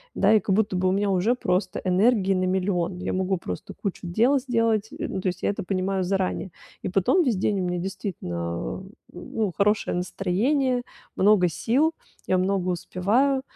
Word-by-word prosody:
да? 205 +2 +4
И 215 - +6
как 195 -2 0
будто 205 -3 +1
бы 185 +1 +1
у - - +3
меня 200 +1 +1
уже 195 +6 +2
просто 185 -4 -1
энергии 195 +1 +3
на 185 -1 0
миллион. 185 -1 -1
Я - - -3
могу 190 +1 0
просто 90 - -6
кучу 195 -3 -5
дел 235 +11 +3
сделать. 230 -4 +1
Э, - - -3
ну, 190 - -3
то 190 - -2
есть 180 0 -3
я - - +2
это 205 +1 -3
понимаю 190 0 -1
заранее. 190 0 -1 0.3
И - - -3
потом 195 - +3
весь 250 -7 +1
день 195 +1 0
у - - -1
меня 180 0 -1
действительно, 190 - -5
а, 85 - -4 0.3
ну, 200 +3 -3
хорошее 210 -2 +1
настроение, 245 +9 0 0.3
много 190 -2 +4
сил, 270 - +1 0.3
я 185 - +2
много 185 0 0
успеваю. 215 +10 +1
195 Hz, 185 wpm, -25 LUFS, 180-220 Hz, 0.3 s, И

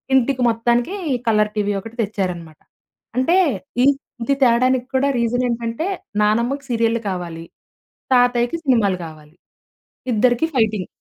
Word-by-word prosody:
ఇంటికి 260 0 +2
మొత్తానికి 240 - 0 0.3
colour 210 -1 +2
TV 205 -1 0
ఒకటి 225 +4 -10
తెచ్చారన్నమాట. 180 -6 -4 0.6
అంటే 335 +9 +3 0.5
ఈ - - +5 0.4
ఇది 275 +4 +1
తేడానికి 255 +1 +3
కూడా 270 +2 +3
రీజన్ 240 +2 0
ఏంటంటే 235 +4 -2 0.4
నానమ్మకి 235 +7 +1
సీరియల్లు 230 -1 +1
కావాలి, 170 -3 -5 0.7
తాతయ్యకి 245 +2 +3
సినిమాలు 215 -8 +2
కావాలి. 155 0 -13 0.8
ఇద్దరికి 245 +6 +2
ఫైటింగ్. 215 -5 +1
230 Hz, 115 wpm, -20 LUFS, 210-250 Hz, 0.8 s, ఈ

